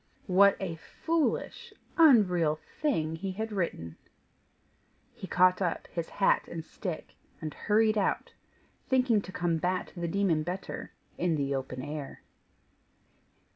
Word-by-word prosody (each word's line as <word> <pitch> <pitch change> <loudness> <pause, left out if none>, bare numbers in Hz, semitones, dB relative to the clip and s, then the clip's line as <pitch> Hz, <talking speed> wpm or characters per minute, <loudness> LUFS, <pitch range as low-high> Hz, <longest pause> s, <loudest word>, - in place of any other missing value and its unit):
What 200 +1 +5
a 175 -4 -4 0.3
foolish, 330 -2 -1 0.2
unreal 190 - +5 0.3
thing 160 - 0
he 190 +2 -4
had 220 +3 -4
written! 170 - -3 1.2
He 190 - -8
caught 185 +1 +4
up 175 -3 -1
his 170 -1 -3
hat 195 - +2
and 165 -2 -6
stick 175 0 -6 0.2
and 155 -2 -5
hurried 215 0 +2
out, 195 - -1 0.5
thinking 250 -5 +3
to 190 - -9
combat 175 +1 -1
the 175 -1 -3
demon 175 -3 +1
better 180 +4 -5 0.3
in 175 -2 +2
the 140 -2 -1
open 130 -1 -4
air. 145 -1 -6
180 Hz, 125 wpm, -29 LUFS, 160-205 Hz, 1.2 s, What